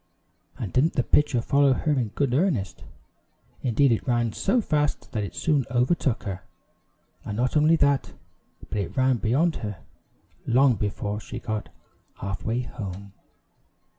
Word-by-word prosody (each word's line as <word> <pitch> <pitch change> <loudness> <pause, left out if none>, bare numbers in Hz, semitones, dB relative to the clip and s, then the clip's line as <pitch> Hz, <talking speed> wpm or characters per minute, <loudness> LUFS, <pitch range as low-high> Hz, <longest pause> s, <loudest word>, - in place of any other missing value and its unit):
And 100 -6 -5
didn't 155 +6 +3
the 125 - +1
pitcher 140 -4 +2
follow 140 0 +4
her 150 +4 -1
in 130 -6 +1
good 125 +4 -1
earnest! 135 - 0 0.8
Indeed, 130 +2 +3
it 115 - 0
ran 120 -3 +1
so 240 +6 +1
fast 150 -8 -1
that 110 - -2
it 100 - -6
soon 150 -4 +1
overtook 125 0 +1
her, 95 -2 -5 0.8
and 105 - -5
not 125 +4 0
only 155 +2 +5
that, 140 -3 +1 0.5
but 105 - -3
it 100 - -4
ran 130 -1 +3
beyond 140 +10 +1
her, 105 -3 -5 0.7
long 130 +2 +5
before 105 0 -3
she 120 - -8
got 110 -3 -4 0.5
half 95 0 -5
way 115 +3 0
home. 100 -5 -7
125 Hz, 150 wpm, -25 LUFS, 105-145 Hz, 0.8 s, only